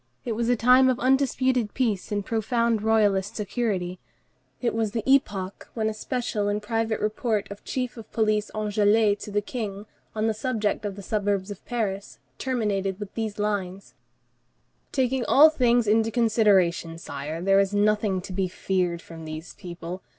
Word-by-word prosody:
It 240 - -2
was 230 +1 -1
a 245 - +4
time 250 +3 +5
of 255 - 0
undisputed 260 -3 +1
peace 220 -6 -1
and 205 -1 -1
profound 230 0 0
royalist 210 -3 +2
security; 195 -5 -2 0.6
it 240 - 0
was 220 -2 -1
the 225 0 -3
epoch 205 -8 +1
when 220 -2 0
a - - -3
special 215 -2 -2
and 205 0 0
private 225 +1 -1
report 215 0 -1
of 200 - -9
Chief 250 -1 -3
of 220 -2 -11
Police 215 -1 +1
Anglès 210 0 +2
to - - -7
the 205 0 0
King, 205 -3 -5 0.3
on 215 0 0
the 225 - +2
subject 215 -2 -1
of 200 -2 -3
the 200 - -9
suburbs 205 -2 -1
of 200 - -9
Paris, 205 -5 -3 0.2
terminated 205 -7 -1
with 205 -2 -7
these 220 -2 -3
lines:— 200 -2 -3 1.0
"Taking 260 -1 +1
all 310 +3 +7
things 245 -5 +3
into 220 +1 +3
consideration, 205 -8 +2
Sire, 150 0 -6
there 195 +2 +4
is 195 0 +2
nothing 205 -2 +1
to 185 +1 -8
be 190 0 0
feared 180 -2 -1
from 165 -1 -10
these 155 +2 -7
people. 175 +1 -8
210 Hz, 165 wpm, -25 LUFS, 195-230 Hz, 1.0 s, all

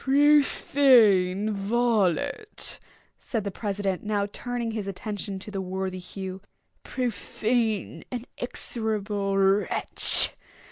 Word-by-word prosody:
"Profane 260 -8 +4
varlet!" 220 - 0 0.4
said 225 -4 -3
the 200 - -3
president, 200 -2 -2
now 210 -1 0
turning 245 -1 -3
his 215 -3 -4
attention 200 0 -4
to 205 +2 -8
the 195 -1 -3
worthy 190 0 -3
Hugh, 190 +1 -7 0.4
"profane 225 -5 -1
and 245 -1 -4
execrable 210 -5 -2
wretch! 195 +1 +3
210 Hz, 95 wpm, -26 LUFS, 195-235 Hz, 0.4 s, Profane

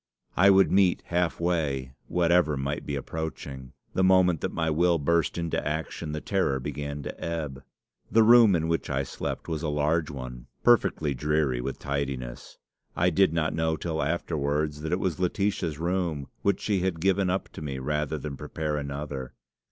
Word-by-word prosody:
I 95 +3 +6
would 95 0 +5
meet 95 -2 +3
half 90 -1 0
way 75 -7 -1
whatever 85 -3 +3
might 70 +2 -3
be 70 - -2
approaching. 70 -3 -6 0.2
The 95 - +2
moment 95 -3 +4
that - - -1
my 80 -1 0
will 85 +2 +3
burst 85 +3 +1
into 85 -1 -1
action 80 +1 -3
the 75 - -3
terror 85 -7 0
began 70 +1 -5
to - - -7
ebb. 75 -5 -3 0.5
"The 115 0 +6
room 115 -3 +7
in 80 -1 0
which 85 0 -1
I 70 +1 0
slept - - -5
was 80 -2 -2
a 80 - -1
large 75 +2 +1
one, 65 -3 -7 0.2
perfectly 90 -10 +3
dreary 75 -2 0
with 70 +2 -4
tidiness. 70 -4 -4 0.4
I 90 +1 +3
did 95 0 +4
not 80 -1 0
know 80 0 +1
till 80 -2 -2
afterwards 75 -1 -1
that 80 - -3
it 90 - +1
was 90 -3 -1
Laetitia's 90 -3 0
room, 85 -3 -1 0.2
which 100 -1 +1
she 100 -3 +1
had 90 -2 -1
given 95 +1 +2
up 95 +2 -1
to - - -10
me 70 -3 -4
rather 75 +3 -1
than 75 -1 -5
prepare 75 +1 -3
another. 70 -2 -5
80 Hz, 175 wpm, -27 LUFS, 70-90 Hz, 0.5 s, room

